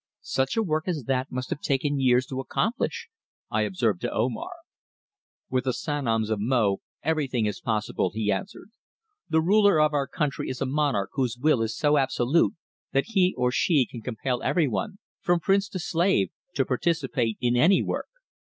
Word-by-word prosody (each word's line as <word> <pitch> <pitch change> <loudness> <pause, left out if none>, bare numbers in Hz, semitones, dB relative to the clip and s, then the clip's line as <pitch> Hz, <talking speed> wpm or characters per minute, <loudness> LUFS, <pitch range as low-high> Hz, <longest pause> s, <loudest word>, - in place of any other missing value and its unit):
"Such 135 +9 -1
a 225 - +3
work 155 -3 -1
as 160 -7 -2
that 130 +2 -1
must 125 0 -4
have 145 - -3
taken 140 +1 0
years 125 -1 +3
to 130 0 -5
accomplish," 215 - -2 0.4
I - - +1
observed 115 - 0
to - - -2
Omar. 115 +1 -1 1.0
"With 130 0 0
the 130 - +1
Sanoms 115 -8 -1
of 110 - 0
Mo 105 -3 +1 0.2
everything 140 -7 0
is 105 - -3
possible," 105 -4 -1
he 105 -1 -1
answered. 200 +2 -5 0.6
"The 160 0 +3
ruler 200 -1 +5
of 155 0 +3
our 140 -2 0
country 145 0 -2
is 130 - -4
a 135 - 0
monarch 135 -8 0
whose 125 -4 -1
will 140 -2 +2
is 115 0 -2
so 150 0 +3
absolute 135 +3 +2 0.4
that 135 +9 +1
he 190 -4 +2
or 125 0 +2
she 145 0 +3
can 120 - -9
compel 125 +2 -3
everyone, 145 - 0 0.2
from 175 0 +2
prince 195 +3 +2
to - - -5
slave, 170 - +1 0.2
to 135 - +2
participate 130 -4 0
in 120 0 +1
any 165 +10 +4
work. - - -3
135 Hz, 175 wpm, -26 LUFS, 120-160 Hz, 1.0 s, ruler